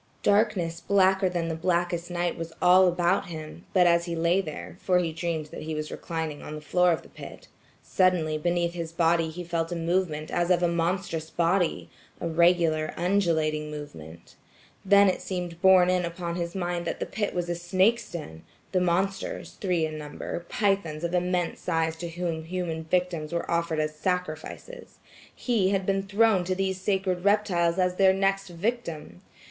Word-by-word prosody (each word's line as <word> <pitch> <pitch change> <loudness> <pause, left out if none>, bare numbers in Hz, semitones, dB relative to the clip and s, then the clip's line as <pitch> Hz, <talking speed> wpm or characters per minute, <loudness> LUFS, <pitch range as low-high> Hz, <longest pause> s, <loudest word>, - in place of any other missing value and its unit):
Darkness 200 -5 +2
blacker 190 -1 +3
than 175 -2 -2
the 165 - -2
blackest 175 +1 -1
night 175 0 -1
was 165 0 -6
all 185 +1 +6
about 180 +2 +1
him; 160 0 -8
but 180 -2 +4
as 170 0 +4
he 170 -1 -3
lay 170 +3 +2
there, 155 -5 -7
for 180 -1 +2
he 170 -3 0
dreamed 165 -1 -2
that - - -7
he 155 0 -4
was 155 0 -4
reclining 160 -3 -4
on 155 - -7
the - - -6
floor 180 +4 +3
of 165 - -1
the - - -15
pit, - - -11 0.4
suddenly 180 -5 +2
beneath 170 +2 0
his 165 -2 -5
body 165 -1 +2
he 175 +3 -7
felt 165 -1 -2
a - - -2
movement 165 -2 -1
as 175 0 0
of 180 -1 +3
a - - +4
monstrous 170 -1 -1
body–a 170 0 -1
regular 165 -2 +2
undulating 165 -5 +1
movement. 85 - -10 0.5
Then 200 +1 +6
it 185 - 0
seemed 175 -2 -5
borne 185 -1 +6
in 180 -1 +1
upon 170 0 -4
his 170 0 -4
mind 175 -2 -2
that - - -3
the - - -2
pit 205 -1 -3
was 175 -1 -1
a 175 - -1
snake's 190 +7 +1
den; 80 - -7 0.3
the 185 - +2
monsters–three 180 -1 -1
in 155 0 -5
number–pythons 170 +2 -2
of 170 +1 -2
immense 180 -1 0
size 165 -2 -1
to 170 0 -5
whom 165 -2 -3
human 165 -2 -3
victims 170 -2 -1
were 170 - -2
offered 170 -2 0
as 155 0 -1
sacrifices. 180 - -4 0.4
He 220 -7 +1
had 195 -1 0
been 195 0 +1
thrown 200 0 +3
to 185 +1 -1
these 190 0 -2
sacred 190 -2 0
reptiles 190 -4 +2
as 180 -1 +1
their 190 -1 +5
next 195 0 0
victim. 170 - -4
175 Hz, 175 wpm, -27 LUFS, 165-185 Hz, 0.5 s, all